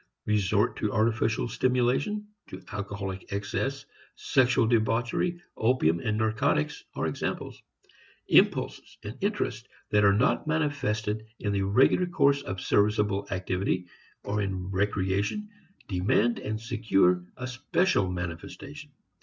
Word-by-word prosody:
Resort 105 -3 +1
to - - -1
artificial 110 +1 +1
stimulation, 130 - +1 0.2
to 95 - -8
alcoholic 100 -1 -5
excess, 135 +7 -2 0.3
sexual 125 -2 +3
debauchery, 120 +9 +1 0.2
opium 110 -9 +2
and 105 +5 -1
narcotics 110 -8 0
are - - -1
examples. - - -4 0.7
Impulses - - +2
and 105 +3 -6
interests 125 - -2 0.2
that 105 0 +4
are 100 - +6
not 115 +9 +2
manifested 110 -9 -1
in 100 -2 -2
the 100 - +1
regular 125 - +3
course 140 -4 +3
of 95 -8 -5
serviceable 105 -1 +1
activity 90 0 -1 0.4
or 105 +1 -1
in 95 -1 -3
recreation 100 - 0 0.4
demand 105 +5 +1
and 110 +1 -3
secure 105 -6 +2
a 125 - -5
special 130 - +1
manifestation. 90 - -7
110 Hz, 115 wpm, -28 LUFS, 100-125 Hz, 0.7 s, are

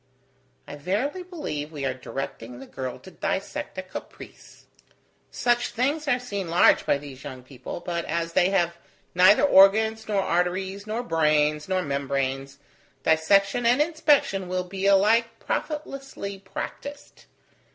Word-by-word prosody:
"I - - -8
verily 215 - -2
believe 300 - -5
we 145 -3 -5
are 130 - 0
directing 130 -2 -6
the 135 - -10
girl 130 -2 -6
to 190 - -14
dissect - - -4
a - - -3
caprice. - - -11 0.6
Such 240 0 +1
things 285 +6 -1
are 250 -3 +3
seen 200 -8 -5
large 170 +2 +4
by - - +3
these 140 -2 -11
young 130 -3 -8
people, 130 +5 -8
but 170 -1 -3
as 165 +1 -2
they 180 - +4
have 175 -3 +1 0.4
neither 185 +7 +6
organs, 220 -1 +5
nor 200 -2 +1
arteries, 190 +4 -1
nor 225 +3 -2
brains, 150 -4 +1
nor 185 -1 +1
membranes, 140 -1 -2 0.5
dissection 195 +9 +3
and 245 +3 +4
inspection 295 - +2
will 180 0 -1
be 190 +2 -3
alike 210 +4 +4
profitlessly 270 -10 -5
practised. 285 +8 -8
190 Hz, 140 wpm, -25 LUFS, 150-225 Hz, 0.6 s, neither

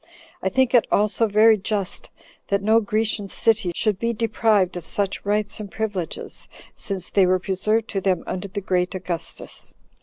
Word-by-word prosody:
I - - 0
think 260 -1 +2
it 245 - +5
also 215 +2 +3
very 215 +1 +5
just 200 -1 -2 0.4
that 200 0 0
no 220 +2 +5
Grecian 215 -1 -1
city 220 -5 +1
should 210 -4 +1
be 235 0 0
deprived 215 -4 +1
of 175 - -5
such 200 -2 -2
rights 210 +1 -1
and 210 -2 -6
privileges, 205 -4 -4 0.3
since 190 -3 -5
they 195 -2 +4
were 185 +1 +3
preserved 215 +4 0
to 195 - -2
them 190 -1 +1
under 185 +2 -4
the 200 +1 -5
great 180 -1 0
Augustus. 180 -3 -6
205 Hz, 170 wpm, -23 LUFS, 190-220 Hz, 0.4 s, it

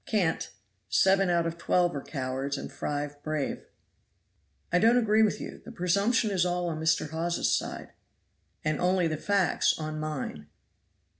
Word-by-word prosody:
"Cant! 175 - 0 0.4
seven 195 0 +4
out 170 -1 +2
of 165 0 -4
twelve 175 -1 +2
are 140 - -3
cowards 135 0 -3
and - - -6
five 145 0 -4
brave." 155 -2 -3 1.1
"I 180 - +5
don't 230 +4 +5
agree 220 -2 +3
with 215 -2 +2
you. - - -8
The 235 - -10
presumption 205 +4 +1
is 185 -3 +2
all 175 -1 0
on 155 -1 -4
Mr. 160 -1 +1
Hawes's 170 +2 +1
side." - - -4 0.8
"And 155 -1 0
only 180 -1 +3
the 155 -1 -2
facts 200 +1 +2
on 155 -1 -4
mine." 135 - -4
170 Hz, 155 wpm, -28 LUFS, 155-190 Hz, 1.1 s, I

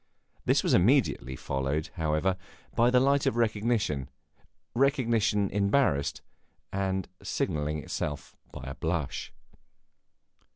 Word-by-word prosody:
This - - +3
was - - +2
immediately 100 - +3
followed, 70 +4 -2
however, 80 +4 +1 0.4
by 120 +1 +4
the 125 0 +5
light 140 +1 +3
of - - +1
recognition 110 - 0 0.6
recognition 115 -6 +2
embarrassed, 100 - +1 0.5
and 95 -1 -1
signalling 75 0 -1
itself 75 -1 -4 0.2
by - - -9
a 70 +1 -5
blush. 80 -1 -3
95 Hz, 100 wpm, -29 LUFS, 75-115 Hz, 0.6 s, the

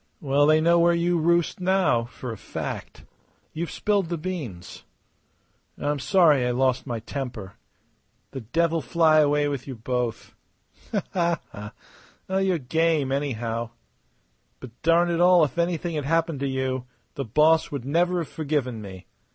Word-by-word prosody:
"Well, 145 0 +2
they 155 0 +5
know 170 +1 +4
where 170 0 +4
you 170 0 +1
roost 170 +2 +1
now, 180 -10 +2
for 125 0 -8
a - - -5
fact. - - -7 0.5
You've 165 0 -4
spilled 200 -2 0
the 170 - -2
beans. 150 - -6 0.9
I'm 145 0 -2
sorry 155 -4 +4
I 125 - 0
lost 130 +1 0
my 120 -3 -3
temper. 120 -6 -6 0.8
The 135 - -6
devil 165 +7 0
fly 155 +3 +3
away 145 0 +3
with 140 -2 -4
you 135 - -6
both!" 120 0 -3 0.6
The - - -1
boy 170 -2 +1 0.2
laughed. 105 0 -9 0.7
"You're 190 -2 +1
game, 160 0 0
anyhow. 120 -4 -2 0.9
But 130 - -10
darn 170 +1 +3
it 170 0 0
all, 180 -1 +6
if 150 +3 -1
anything 170 0 -1
had 150 -3 -3
happened 165 -1 0
to 140 - -1
you 130 -1 -2 0.3
the 140 - -4
boss 155 +7 +3
would 140 -4 -5
never 175 +5 +1
have - - -11
forgiven 140 -7 -2
me. 95 -3 -10
150 Hz, 155 wpm, -25 LUFS, 125-170 Hz, 0.9 s, all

